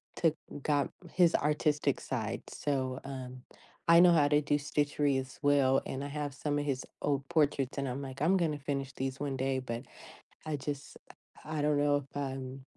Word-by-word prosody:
took 165 -2 +2 0.3
got 145 -1 +1 0.2
his 175 -2 +5
artistic 150 -1 +1
side, 115 -4 -3
so, 130 -3 -2
um, 130 -2 -7 0.5
I 170 0 +8
know 175 0 +8
how 145 -3 +5
to 150 0 +4
do 145 - +1
stitchery 145 -1 +1
as 130 0 -8
well, 140 -2 +4
and 135 +1 -4
I - - -3
have 145 -1 -3
some 145 +1 -1
of 145 - -2
his 135 -3 -2 0.2
old 140 -1 0
portraits, 145 -5 +1
and 140 -1 -1
I'm 130 +3 -3
like, 135 0 -7
"I'm 185 +5 +4
gonna 155 -4 0
finish 140 -1 -3
these 135 0 -3
one 140 -2 -2
day," 130 0 0
but 120 0 -5 0.6
I 155 -1 -1
just 145 +1 -5 0.5
I 155 -1 -2
don't 150 0 +2
know 145 0 +3
if 140 0 -9
I'm 135 -1 -4
140 Hz, 190 wpm, -32 LUFS, 135-150 Hz, 0.6 s, I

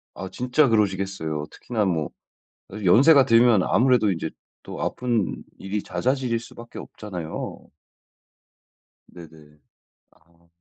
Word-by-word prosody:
아 95 0 -6
진짜 125 +4 +2
그러시겠어요. 95 -8 -1
특히나 110 -4 -2
뭐 80 -5 -1 0.6
사실 105 0 -7
연세가 135 - +6
들면 115 -5 +5
아무래도 120 -3 +3
인제 80 -2 -3 0.3
또 - - -7
아픈 120 -4 -1
일이 100 +1 -4
잦아질 130 -2 -1
수밖에 115 0 -11
없잖아요. 90 -7 -7 1.5
네네. 75 -3 -15 0.5
아. 85 +1 -30
105 Hz, 250 characters per minute, -24 LUFS, 85-120 Hz, 1.5 s, 연세가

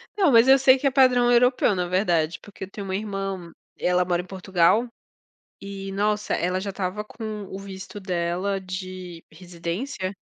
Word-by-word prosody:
Não, 375 -8 +3
mas 230 0 +6
eu 270 +1 +8
sei 265 0 +5
que 275 - 0
é - - +2
padrão 250 -2 +4
europeu, 245 -3 +4
na 180 -1 -1
verdade. 175 -3 +1
Porque 205 -2 -11
eu 190 - -7
tenho 200 0 -7
uma 190 - -2
irmã, 195 -4 -4 0.3
ela 180 0 +2
mora 175 -1 0
em - - -13
Portugal 190 +4 +2 0.7
e, 195 0 -7
nossa, 210 +1 0
ela 180 +2 -1
já 200 +1 -4
estava 195 +2 -3
com 215 -1 -6
o 190 - -6
visto 195 0 -9
dela 185 +1 -1
de 185 -2 -7
residência 180 - -5
195 Hz, 175 wpm, -24 LUFS, 180-215 Hz, 0.7 s, eu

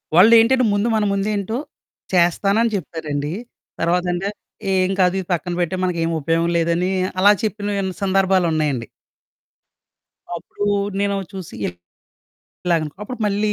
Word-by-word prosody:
వాళ్ళేంటంటే, 230 +6 +6
ముందు 205 +3 +1
మన 215 - +2
ముందేంటో 200 +1 -1 0.6
చేస్తానని 195 +6 +3
చెప్తారండీ. 150 -3 -3 0.5
తర్వాతంటే 175 +2 0 0.5
ఏం 185 0 +2
కాదు 180 0 +3
ఇది 185 - -6
పక్కన 175 +1 -2
పెట్టెయి, 185 +2 -1
మనకేం 170 -2 0
ఉపయోగం 165 +3 +1
లేదని 170 +2 +1 0.3
అలా 200 +2 +7
చెప్పినవి 205 -2 -1 0.2
సందర్భాలున్నాయండి. 170 -9 +1 1.5
అప్పుడూ 205 +4 -5 0.3
నేనో 200 0 +1 0.2
చూసి 190 -3 -7
ఇల్ - - -3 0.9
ఇలాగనుకో. 160 -3 0
అప్పుడు 250 +4 -6
మళ్ళీ 210 +1 +1
185 Hz, 110 wpm, -21 LUFS, 170-205 Hz, 1.5 s, అలా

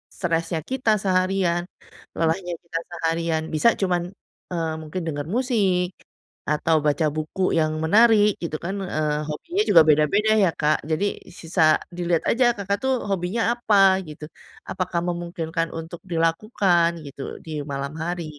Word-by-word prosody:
stresnya 165 -2 -1
kita 260 -3 -2
seharian, 185 -2 +1 0.6
lelahnya 175 +2 0
kita 170 -1 -5
seharian. 165 -1 -1
Bisa 155 +9 +4
cuman, 180 -2 +1 0.5
eee, 165 -2 -2
mungkin 160 +4 -5
denger 145 -2 -3
musik, 200 -9 +1 0.6
atau 155 +2 +2
baca 150 +2 +2
buku 155 +4 -4 0.2
yang 155 0 +1
menarik 210 +3 +5
gitu 165 -2 -3
kan, 190 +3 -2
eee, 150 -3 -1
hobinya 345 - -2
juga 170 -4 +8
beda-beda 155 +9 +3
ya, 185 - +4
Kak. 150 0 0
Jadi 160 +6 +1 0.3
sisa 160 -2 +3 0.2
dilihat 175 -2 0
aja 240 0 +3
Kakak 200 0 -1
tuh 265 - +2 0.2
hobinya 190 +4 -1 0.2
apa? 195 -5 +4
gitu. 150 0 -9 0.4
Apakah 180 -2 -2
memungkinkan 170 -1 -3
untuk 165 +1 -7
dilakukan 170 +1 +2 0.2
gitu 140 -1 -9 0.2
di 160 - -8
malam 140 0 -4
hari? 175 +1 -3
170 Hz, 135 wpm, -23 LUFS, 160-195 Hz, 0.6 s, juga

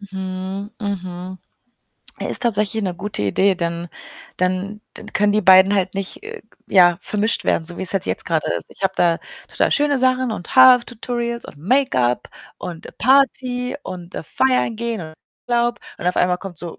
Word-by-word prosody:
Mhm, 190 0 -5
mhm. 185 -2 -5 0.8
Äh, - - -3
ist - - +2
tatsächlich 215 -1 +1
'ne 185 -2 -2
gute 200 - -3
Idee, 190 - +2
dann 170 -1 -3 0.5
dann 185 +3 -1
dann - - -10
können 205 0 +2
die 210 - +2
beiden 190 +2 +7
halt 190 -1 0
nicht, 195 -1 -4
äh, - - -8
g 220 - -37 0.2
ja, 175 -2 +6
vermischt 210 +2 0
werden, 160 - +1
so 175 +1 -3
wie's 185 - 0
halt 195 -2 -1
jetzt - - -2
grade 165 -3 -1
ist. - - -8
Ich - - -16
habe 190 0 +1
da 170 -1 +3 0.3
total - - 0
schöne 290 -1 +2
Sachen 255 -2 +2
und 180 0 -7
Haar-Tutorials 240 -2 +4
und - - -11
Make-up 150 - +1 0.3
und 170 -2 -7
Party 255 0 +2
und, 175 -1 -8
äh, - - -4
feiern 255 - +1
gehen 230 -2 -3
und 155 -2 -9 0.3
Urlaub 240 0 +1 0.2
und - - -5
auf 180 - +1
einmal 180 0 +2
kommt 185 -4 -9
so 170 0 -7
195 Hz, 180 wpm, -20 LUFS, 180-235 Hz, 0.8 s, beiden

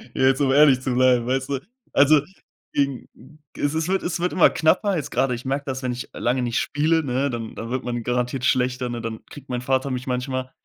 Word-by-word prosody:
Jetzt 135 +1 +3
um 135 -2 +3
ehrlich 140 -2 +5
zu 130 -1 -2
bleiben, 125 -1 +3
weißt 130 +1 -1
du. 140 -2 -1 0.3
Also, 145 +1 +5 0.5
gegen 140 -2 -1 0.5
Es 145 +1 0
es 160 +1 -1
wird 190 0 0
es 175 -1 -2
wird 180 +1 -1
immer 180 - +6
knapper 185 +5 +2
jetzt 150 - -4
gerade. 135 -2 +1
Ich 120 - -9
merke 140 +2 -2
das, 130 -1 -4
wenn 125 - -1
ich 125 0 -6
lange 125 +2 0
nicht 120 -1 0
spiele, 155 +2 +1
ne, 135 +1 0
dann 115 -2 -5
dann 115 - -6
wird 130 +1 -2
man 120 -1 -3
garantiert 125 +2 -1
schlechter, 125 -1 +1
ne? 120 -1 -4
Dann 115 -1 -6
kriegt 140 -1 -13
mein 125 -1 -2
Vater 130 +2 0
mich 125 +1 -4
manchmal. 130 +1 -3
130 Hz, 225 wpm, -23 LUFS, 125-140 Hz, 0.5 s, immer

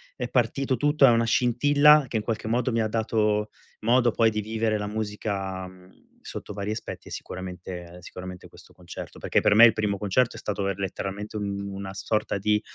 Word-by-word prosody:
è 125 - -3
partito 130 +2 +1
tutto 145 +3 +4
e 130 - +7
una 115 0 +3
scintilla 145 +6 +5
che 115 - -1
in 105 - -2
qualche 110 -2 -3
modo 125 +2 +1
mi 115 - +2
ha 110 - +1
dato 105 -1 0 0.3
modo 120 +2 +3
poi 115 +1 +3
di 105 -1 -2
vivere 110 0 -1
la 105 0 -4
musica, 105 -3 -3
mh, 95 0 -18
sotto - - -8
vari 100 +1 -3
aspetti, 110 - -6
è - - -11
sicuramente 90 -1 -7
sicuramente 90 +1 -9
questo - - -17
concerto. 90 -1 -10
Perché - - +1
per 105 - +3
me 115 - +8
il 115 - +7
primo 105 -2 -1
concerto 105 +5 +1
è - - -7
stato 100 -2 -2
er 100 - -2
letteralmente 100 +2 -4
un 100 -1 -3
una 95 0 -6
sorta 105 +2 -1
di 105 +2 +1
105 Hz, 200 wpm, -26 LUFS, 100-115 Hz, 0.3 s, me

